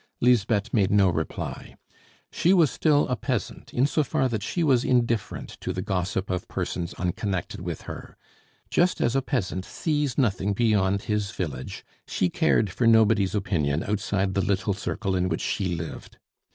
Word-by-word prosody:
Lisbeth 115 -3 +2
made 100 -5 +3
no 100 -2 +4
reply. 80 -2 -4 0.6
She 180 - +3
was 165 -7 +4
still 150 -2 +3
a 125 - 0
peasant, 105 - -4
in 125 - +2
so 150 +2 +1
far 145 -2 +1
that 110 -3 -2
she 170 - -1
was 130 -5 +3
indifferent 120 -3 -1
to - - -2
the 90 - -3
gossip 95 0 -2
of 90 - -3
persons 85 0 -3
unconnected 90 +1 -3
with - - -5
her. - - -9 0.5
Just 180 +1 +2
as 120 - +1
a 135 - +3
peasant 95 -9 -2
sees 150 - -1
nothing 105 -6 +1
beyond 100 -3 +2
his 105 -2 -1
village, 75 -9 -5 0.2
she 90 -2 0
cared 105 -4 +2
for 115 +6 +1
nobody's 110 -3 +4
opinion 80 -7 0
outside 100 -2 -1
the 95 - +1
little 100 +1 0
circle 100 -1 -2
in 90 0 +1
which 80 - -2
she 90 -3 -1
lived. 80 -1 -7
105 Hz, 165 wpm, -26 LUFS, 95-120 Hz, 0.6 s, no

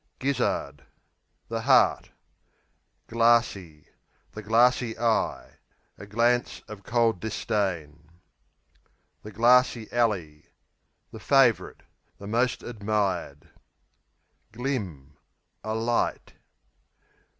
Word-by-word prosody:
Gizzard 75 - -2 0.6
The 115 0 -3
heart. 130 +1 +3 1.0
Glassey 115 -9 +1 0.5
The 110 - -8
glassy 115 +2 +2
eye; 115 -1 -1 0.4
a 105 - -12
glance 120 +3 0
of 105 -2 -10
cold 115 -1 +1
disdain. 85 -8 -3 1.1
The 105 - -10
Glassey 120 +1 +3
Alley 95 -11 -1 0.6
The - - -10
favourite; 135 -5 +2 0.4
the 100 - -11
most 120 +5 0
admired. 100 - -3 1.0
Glim 105 - -5 0.5
A 110 0 -3
light. 115 +1 -1
110 Hz, 80 wpm, -26 LUFS, 95-120 Hz, 1.1 s, heart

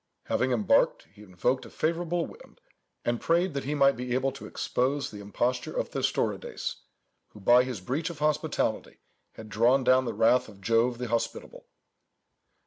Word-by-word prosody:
Having 130 +1 0
embarked, 110 -6 +2
he 105 - -16
invoked 105 +7 -1
a - - -11
favourable 170 +1 -1
wind, - - -15 0.5
and 120 0 0
prayed 175 +1 +2
that 140 -1 -3
he 150 +2 -1
might 140 -1 +4
be 125 0 -3
able 135 +1 +1
to 135 - -10
expose 140 +3 -1
the 105 - -9
imposture 120 +5 -2
of - - -1
Thestorides, - - -2 0.6
who, 105 - -12
by 120 +5 +5
his 125 -7 -5
breach 140 - -2
of 170 - -8
hospitality, 150 0 -1 0.4
had 110 - -10
drawn 120 +5 +3
down 130 +1 +4
the 115 - -3
wrath 125 +2 +3
of 100 -2 -15
Jove 115 +4 +2
the 125 0 -4
Hospitable. 115 0 -3
125 Hz, 165 wpm, -28 LUFS, 115-140 Hz, 0.6 s, by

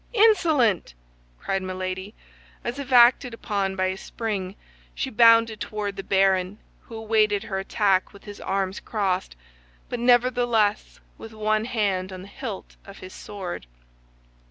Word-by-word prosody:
"Insolent!" 315 - +3 0.4
cried 195 - -2
Milady; 185 +2 -5 0.5
and 240 - -2
as 275 - -10
if 275 -1 -7
acted 245 0 +5
upon 200 -4 -2
by 185 -1 0
a 185 0 -1
spring, 200 -3 -4 0.4
she 265 - -3
bounded 230 -1 +5
toward 205 -2 -4
the 195 - -5
baron, 190 0 +1 0.3
who 230 - -10
awaited 215 -2 +1
her 200 -4 -3
attack 195 -1 +1
with 200 - -16
his 205 -1 -10
arms 195 0 -2
crossed, 195 - -2 0.5
but 245 - -4
nevertheless 240 -3 +2 0.2
with 225 0 -10
one 215 0 0
hand 200 -6 -1
on 185 0 -8
the - - -11
hilt 220 -2 -8
of 200 - -13
his 185 0 -11
sword. 185 - -7
210 Hz, 145 wpm, -24 LUFS, 190-230 Hz, 0.5 s, acted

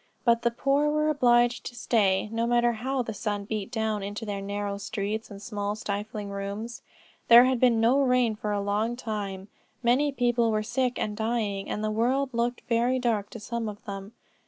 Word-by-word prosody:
But 235 -1 +4
the 235 - +2
poor 275 +5 +1
were 305 +1 +1
obliged 240 -4 +3
to 245 - -8
stay, 205 -5 +2
no 230 +1 0
matter 240 0 +3
how 255 +3 -2
the 225 - -5
sun 205 -1 -3
beat 210 -1 -3
down 220 -3 -1
into 205 +3 -5
their 200 -2 -3
narrow 200 0 -3
streets 210 +2 -3
and 200 -2 -9
small 205 -2 -3
stifling 210 0 -4
rooms. 200 +4 -5 0.5
There 235 +1 +9
had 255 -1 +1
been 240 -2 +4
no 240 +5 +4
rain 250 -4 +2
for 210 0 -3
a 205 -1 0
long 210 +4 0
time; 205 -5 -5 0.4
many 260 +5 +3
people 240 -3 +2
were 215 -1 0
sick 250 +2 -1
and 210 - -2
dying, 220 -3 -2
and 210 - -3
the 215 - 0
world 255 +5 +1
looked 235 +1 -1
very 240 +2 +2
dark 225 -5 0
to 235 - -9
some 230 +1 -3
of 205 0 -10
them. 200 0 -7
225 Hz, 195 wpm, -27 LUFS, 205-240 Hz, 0.5 s, There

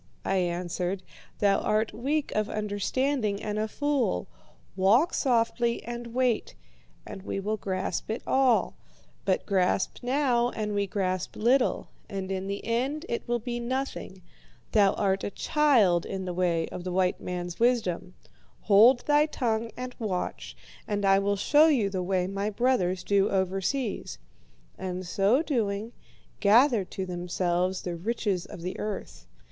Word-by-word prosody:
I 195 - +1
answered, 180 +1 -2 0.3
'thou 200 -1 +3
art 215 +1 0
weak 285 +6 -1
of 215 0 -1
understanding 215 +2 -1
and 210 0 -2
a 215 - 0
fool. 265 - 0 0.5
Walk 225 - +4
softly 235 -2 +1
and 240 0 -6
wait, 250 - 0 0.5
and 200 -2 -8
we 195 - -4
will 210 +2 -2
grasp 190 -2 -3
it 220 - -3
all. 260 -3 +3 0.5
But 190 -2 +1
grasp 190 -1 +1
now, 245 -2 +2
and 210 -3 -3
we 200 -1 0
grasp 185 -2 -2
little, 245 +4 +2 0.2
and 195 -2 -4
in 190 0 -3
the 200 0 -4
end 265 +8 -1
it 235 - -3
will 240 0 +1
be 240 +1 -4
nothing. 240 -6 -4 0.5
Thou 200 -3 +4
art 195 -1 0
a - - -1
child 225 - +3
in 190 -1 -4
the 180 - -3
way 170 -2 +1
of 180 - -7
the 180 - -4
white 185 0 +1
man's 175 -1 -5
wisdom. 190 -7 +1 0.5
Hold 225 +5 +6
thy 295 +1 +4
tongue 230 -6 -1
and 250 0 -6
watch, 195 -6 -4 0.3
and 205 -1 -1
I 195 0 +5
will 200 +1 +1
show 295 +10 +5
you 235 -11 +2
the 190 -2 -2
way 180 0 0
my 195 +2 -2
brothers 200 -6 +1
do 200 -1 +2
overseas, 195 +6 -1 0.6
and, 185 0 -4
so 200 - +2
doing, 220 -6 -1 0.5
gather 230 +1 +5
to 190 +1 -5
themselves 180 +1 -1
the 175 -1 -3
riches 195 -1 -2
of 170 - -9
the 180 +1 -4
earth. 190 - -6
205 Hz, 150 wpm, -27 LUFS, 185-240 Hz, 0.6 s, Hold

